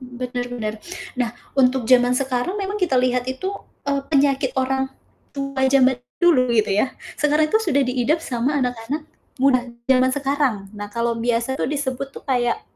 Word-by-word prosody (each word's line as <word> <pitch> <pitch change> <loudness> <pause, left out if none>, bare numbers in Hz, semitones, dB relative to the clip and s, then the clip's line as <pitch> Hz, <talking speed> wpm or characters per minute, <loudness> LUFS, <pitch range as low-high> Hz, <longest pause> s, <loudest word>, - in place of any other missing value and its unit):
Benar 250 -1 -5
benar. 220 -3 -3 0.4
Nah 245 -2 +1 0.3
untuk 255 -1 +3
zaman 245 +1 +4
sekarang 260 +6 -1
memang 405 +1 -3
kita 320 -8 +2
lihat 250 0 +2
itu, 265 +10 -3 0.3
eee, 280 0 0
penyakit 275 -2 +2
orang 265 0 0 0.5
tua 275 -1 -1
zaman 260 -1 +4 0.2
dulu 255 -8 +4
gitu 215 -2 +2
ya, 210 +7 +1 0.2
sekarang 300 +1 +2
itu 440 - +4
sudah 330 -11 +2
diidap 255 +5 +1
sama 260 +2 0
anak-anak 250 +4 -3 0.4
muda 255 -2 +4 0.2
zaman 260 0 +5
sekarang. 280 -2 +1 0.2
Nah 205 - -5
kalau 235 0 0
biasa 235 +2 0
tuh - - 0
disebut 275 -2 -2
tuh - - -9
kayak 245 -3 0
260 Hz, 160 wpm, -22 LUFS, 245-280 Hz, 0.5 s, zaman